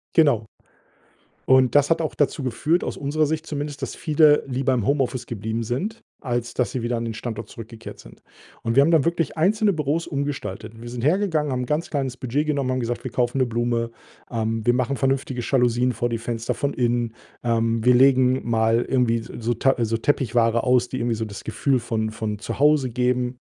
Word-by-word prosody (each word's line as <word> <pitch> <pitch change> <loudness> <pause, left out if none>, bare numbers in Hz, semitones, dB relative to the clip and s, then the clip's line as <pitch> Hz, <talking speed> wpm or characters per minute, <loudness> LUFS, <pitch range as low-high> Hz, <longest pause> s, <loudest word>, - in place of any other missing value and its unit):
Genau. 135 -9 +4 1.0
Und 130 0 +4
das 145 +1 +5
hat 165 0 +2
auch 155 - -3
dazu 145 -1 0
geführt, 150 +8 0
aus - - -3
unserer 150 +2 0
Sicht 160 +2 -2
zumindest, 145 -2 -5
dass - - -4
viele 150 -1 +4
lieber 130 0 0
im 115 -5 0
Homeoffice 135 -3 0
geblieben 110 +1 -3
sind, 180 - -3 0.2
als 120 -3 -2
dass 125 - 0
sie 125 - -3
wieder 120 0 -1
an 115 - -3
den 115 - -3
Standort 110 0 -6
zurückgekehrt 115 0 -10
sind - - -15 0.4
und 115 +1 -1
wir 140 - +7
haben 160 +4 +3
dann 160 -4 +4
wirklich 170 -1 -1
einzelne 205 +4 +3
Büros 155 +2 -1
umgestaltet. 115 -7 -4
Wir 120 - -7
sind 120 0 -6
hergegangen, 155 -3 +1
haben 125 0 -1
'n - - -3
ganz 150 +5 -1
kleines 135 -4 -2
Budget 140 +5 -1
genommen, 140 -4 0
haben 130 - 0
gesagt: 120 0 -3
„Wir 130 - -5
kaufen 125 +2 0
'ne 130 - +3
Blume, 115 0 -1 0.4
ähm, 115 -1 -2
wir 120 - +4
machen 130 +2 0
vernünftige 130 -1 -1
Jalousien 125 -1 +2
vor 120 0 -2
die 115 - -1
Fenster 115 0 -3
von 140 0 -2
innen, 120 -2 0 0.3
ähm, 115 -1 +1
wir 125 0 +6
legen 130 -1 +4
mal 115 +1 +2
irgendwie 125 -3 +2
s 115 - -10
so 120 +1 0
Ta 135 +4 +2
so 115 0 0
Teppichware 115 -3 +1
aus“, 125 -1 +3
die 130 - -4
irgendwie 120 -1 0
so 110 0 -3
das 100 -2 -9
Gefühl 130 +3 0
von 110 -1 -2
von 105 -2 -4
zu - - -5
Hause 145 -3 +4
geben, 125 0 0
125 Hz, 205 wpm, -23 LUFS, 115-140 Hz, 1.0 s, wir